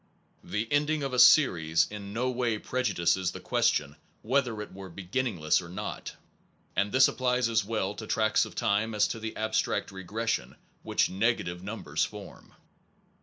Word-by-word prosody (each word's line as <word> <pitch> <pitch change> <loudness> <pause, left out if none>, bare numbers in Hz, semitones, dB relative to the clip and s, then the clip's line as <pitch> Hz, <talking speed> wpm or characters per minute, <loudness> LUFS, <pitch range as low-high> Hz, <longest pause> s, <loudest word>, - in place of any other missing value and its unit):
The 105 +2 -3
ending 150 +1 +1
of 135 -2 -3
a 125 - +1
series 85 - +5
in 100 -1 -7
no 120 +4 -1
way 120 -3 0
prejudices 95 -7 0
the - - -7
question 75 -1 0 0.3
whether 125 -2 0
it 105 - -7
were 95 0 -9
beginningless 95 -2 0
or 85 - -10
not; 105 +4 -6 0.6
and 100 +1 +1
this 130 0 +6
applies 125 -1 +1
as 115 -2 +1
well 100 -2 -2
to 110 +1 -8
tracts 110 -1 +2
of - - -8
time 105 +2 0
as 105 - +3
to 115 - -4
the 110 0 -5
abstract 110 -1 -1
regression 95 - -3 0.3
which - - +1
negative 95 -3 -1
numbers 105 +3 -2
form. - - -8
105 Hz, 160 wpm, -28 LUFS, 95-120 Hz, 0.6 s, this